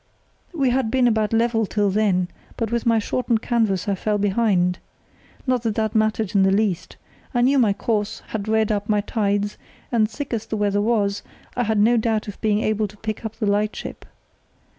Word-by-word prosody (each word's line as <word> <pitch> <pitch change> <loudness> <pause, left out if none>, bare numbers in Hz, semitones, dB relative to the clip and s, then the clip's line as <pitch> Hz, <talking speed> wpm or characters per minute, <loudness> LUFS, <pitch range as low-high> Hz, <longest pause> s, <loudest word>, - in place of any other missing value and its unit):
"We 275 -8 +1
had 255 -2 +1
been 255 +1 +3
about 220 -2 +1
level 225 -1 +2
till 205 -1 +1
then, 190 -3 +1 0.3
but 225 -2 -2
with 235 0 -1
my 230 -1 +4
shortened 230 +1 0
canvas 220 -7 0
I 200 - +2
fell 210 +2 -1
behind. 195 -3 +1 0.7
Not 255 -3 +1
that 225 -2 -1
that 220 -2 0
mattered 215 -2 +1
in 200 - +4
the 190 - +4
least. 195 -3 0 0.4
I 240 - +3
knew 270 +3 +4
my 225 -5 +4
course, 215 +1 -2
had 215 -1 -4
read 220 0 +2
up 205 0 -2
my 210 -1 +3
tides, 205 -1 -1 0.3
and, 220 -3 +2
thick 270 +3 -6
as 225 -2 -3
the 220 - -3
weather 205 -1 +1
was, 205 -3 +1 0.3
I 245 - 0
had 220 0 0
no 230 +4 +4
doubt 220 -1 0
of 205 - -8
being 215 -1 +2
able 215 -1 0
to 210 +1 -16
pick 215 +1 -5
up 220 -1 -5
the 220 - -2
lightship. 205 +1 -2
215 Hz, 200 wpm, -22 LUFS, 205-230 Hz, 0.7 s, my